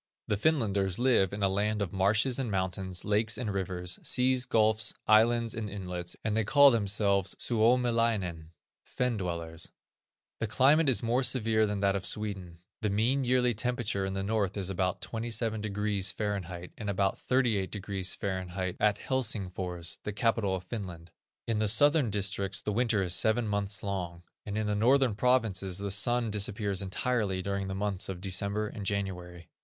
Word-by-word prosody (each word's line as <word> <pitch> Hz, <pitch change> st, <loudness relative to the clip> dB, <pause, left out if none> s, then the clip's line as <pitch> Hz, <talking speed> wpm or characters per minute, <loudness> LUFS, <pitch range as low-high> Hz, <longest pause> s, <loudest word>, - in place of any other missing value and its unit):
The 105 Hz, -, +1 dB
Finlanders 100 Hz, -, +1 dB
live 120 Hz, -7 st, +3 dB
in 100 Hz, 0 st, -4 dB
a -, -, +5 dB
land 105 Hz, +2 st, 0 dB
of 100 Hz, -4 st, -3 dB
marshes 105 Hz, +7 st, +2 dB
and 130 Hz, -4 st, -1 dB
mountains, 95 Hz, -1 st, -2 dB
lakes 105 Hz, +1 st, +1 dB
and 110 Hz, -4 st, -3 dB
rivers, 90 Hz, -2 st, -1 dB
seas, 130 Hz, 0 st, +2 dB
gulfs, 110 Hz, -2 st, +2 dB
islands, 115 Hz, +1 st, +4 dB
and 110 Hz, -2 st, -4 dB
inlets, 90 Hz, -3 st, -5 dB
and 110 Hz, -1 st, -1 dB
they 110 Hz, -, +2 dB
call 140 Hz, +5 st, +6 dB
themselves 100 Hz, -3 st, +1 dB
Suomilainen, 115 Hz, -8 st, +1 dB, 0.3 s
Fen 125 Hz, -2 st, -2 dB
dwellers. 85 Hz, -3 st, -5 dB, 0.7 s
The 110 Hz, -, -1 dB
climate 140 Hz, +7 st, +4 dB
is 125 Hz, -, +2 dB
more 120 Hz, +3 st, +1 dB
severe 110 Hz, -4 st, +2 dB
than 105 Hz, -1 st, -3 dB
that 100 Hz, -1 st, +2 dB
of 95 Hz, -1 st, 0 dB
Sweden. 95 Hz, -5 st, -4 dB, 0.2 s
The 105 Hz, -, 0 dB
mean 120 Hz, +7 st, +1 dB
yearly 125 Hz, -1 st, +2 dB
temperature 115 Hz, -3 st, -1 dB
in 95 Hz, 0 st, -3 dB
the 95 Hz, -, -2 dB
north 105 Hz, -1 st, -1 dB
is 95 Hz, -1 st, -1 dB
about 90 Hz, -1 st, -1 dB
27°F., 105 Hz, -5 st, -3 dB
and 105 Hz, -2 st, -4 dB
about 100 Hz, 0 st, 0 dB
38°F., 95 Hz, -5 st, -2 dB
at 105 Hz, -1 st, +3 dB
Helsingfors, 95 Hz, -10 st, -2 dB
the 105 Hz, -, -5 dB
capital 110 Hz, -3 st, +1 dB
of 90 Hz, -, -6 dB
Finland. 90 Hz, -7 st, -7 dB, 0.4 s
In 115 Hz, -2 st, 0 dB
the 110 Hz, -, +1 dB
southern 145 Hz, +4 st, +4 dB
districts 100 Hz, -1 st, 0 dB
the 105 Hz, -, -2 dB
winter 115 Hz, -3 st, +2 dB
is 90 Hz, -2 st, +2 dB
seven 110 Hz, +3 st, +2 dB
months 100 Hz, +1 st, -2 dB
long, 90 Hz, -4 st, -4 dB, 0.2 s
and 105 Hz, +1 st, -3 dB
in 110 Hz, -, -1 dB
the 105 Hz, -, 0 dB
northern 125 Hz, +3 st, +3 dB
provinces 105 Hz, -6 st, +1 dB
the 100 Hz, 0 st, -3 dB
sun 115 Hz, +3 st, +1 dB
disappears 100 Hz, -1 st, -1 dB
entirely 100 Hz, -1 st, -1 dB
during 100 Hz, 0 st, -2 dB
the 95 Hz, -, -4 dB
months 100 Hz, -1 st, -2 dB
of 95 Hz, -2 st, -5 dB
December 100 Hz, +3 st, -2 dB
and 105 Hz, -1 st, -7 dB
January. 90 Hz, -3 st, -4 dB
105 Hz, 160 wpm, -29 LUFS, 95-115 Hz, 0.7 s, call